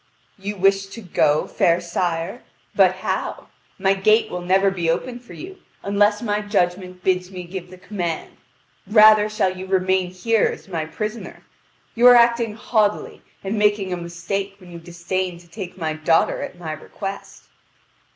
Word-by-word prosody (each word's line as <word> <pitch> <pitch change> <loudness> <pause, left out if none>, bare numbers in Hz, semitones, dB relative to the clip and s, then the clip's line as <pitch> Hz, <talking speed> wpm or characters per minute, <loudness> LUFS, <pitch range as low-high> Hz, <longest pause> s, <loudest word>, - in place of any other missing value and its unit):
"You 205 +2 -4
wish 195 0 +2
to 210 +4 -10
go, 155 -5 +1
fair 170 0 +2
sire? 175 +4 -3 0.3
But - - +5
how? - - -3 0.3
My 195 0 +2
gate 215 +3 +3
will 180 - -4
never 190 +2 +3
be 175 -3 -2
opened 240 +9 -2
for 245 - -14
you 380 +2 -9 0.3
unless 205 +2 +2
my 210 -2 0
judgment 185 -3 -1
bids 180 -1 +1
me 185 -2 -7
give 180 0 -7
the 185 - -12
command; 175 -4 -4 0.5
rather 215 -1 +6
shall 190 -3 0
you 185 +1 -7
remain 185 -1 +1
here 215 +5 +1
as - - -10
my 165 -4 -3
prisoner. 215 +7 -6 0.5
You 240 +2 +5
are 245 - +9
acting 235 -2 +3
haughtily 215 -3 0 0.2
and 205 +2 -2
making 205 -3 +2
a - - 0
mistake 175 +4 -4
when 180 -3 -15
you 170 - -8
disdain 175 +1 -4
to 170 0 -17
take 185 +1 -8
my 160 -3 -2
daughter 155 +1 +1
at - - -7
my 165 -3 -6
request." 195 +6 -7
190 Hz, 165 wpm, -22 LUFS, 175-210 Hz, 0.5 s, are